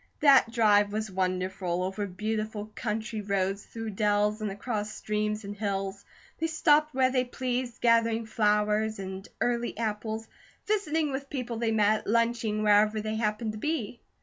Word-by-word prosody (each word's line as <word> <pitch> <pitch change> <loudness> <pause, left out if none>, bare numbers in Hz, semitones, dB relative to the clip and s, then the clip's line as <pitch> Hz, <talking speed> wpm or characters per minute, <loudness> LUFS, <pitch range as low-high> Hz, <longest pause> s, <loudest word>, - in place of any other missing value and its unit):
That 275 -5 +6
drive 210 -3 +4
was 215 -1 -3
wonderful, 185 -1 -1
over 195 +2 -2
beautiful 215 +2 -3
country 220 -1 -3
roads, 195 0 -1
through 225 -1 -5
dells, 210 +1 +1
and 215 - -1
across 210 +1 -3
streams 210 0 -2
and 200 +1 -6
hills. 195 -1 -3 0.4
They 325 - +1
stopped 305 -2 +3
where 260 -1 +3
they 255 -1 +2
pleased, 250 -1 -3
gathering 230 -1 +3
flowers 210 0 +1
and 190 0 -7
early 240 -2 0
apples, 220 0 -3 0.4
visiting 325 -8 0
with 275 +1 -4
people 250 -4 -4
they 230 -1 0
met, 215 0 +2
lunching 230 -1 +1
wherever 210 +1 +4
they 215 +1 -3
happened 215 0 -1
to 215 - -8
be. 250 -6 -2
215 Hz, 150 wpm, -28 LUFS, 205-235 Hz, 0.4 s, That